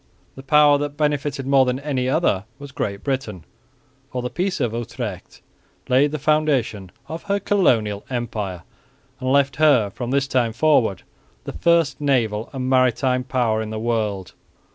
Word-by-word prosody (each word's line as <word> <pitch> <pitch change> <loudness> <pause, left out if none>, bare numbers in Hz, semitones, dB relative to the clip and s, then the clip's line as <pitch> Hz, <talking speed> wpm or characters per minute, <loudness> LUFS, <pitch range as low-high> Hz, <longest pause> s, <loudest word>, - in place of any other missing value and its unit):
The 135 - -10
power 145 +1 +5
that 145 0 -4
benefited 145 -2 -1
more 135 0 +4
than 125 0 -1
any 135 -3 -2
other 120 - +1
was 140 0 -10
Great 100 -5 -4
Britain, 135 - -3 0.6
for 125 -2 -4
the 125 - -4
Peace 185 -1 -2
of 120 -5 -1
Utrecht 115 -4 -6 0.5
laid 135 +4 +4
the 155 - -2
foundation 135 -10 0 0.2
of 160 +3 -6
her 200 0 +2
colonial 115 - +1
empire 110 -8 -4 0.6
and 130 0 -1
left 140 -1 +2
her, 140 -10 +4
from 120 +3 -5
this 135 +1 +1
time 120 -4 0
forward, 120 - +2 0.4
the - - -7
first 170 -4 +2
naval 115 -7 0
and 130 -2 -4
maritime 130 0 +2
power 120 -4 0
in 110 - -5
the 110 - -5
world. 110 -5 -2
130 Hz, 160 wpm, -21 LUFS, 110-145 Hz, 0.6 s, power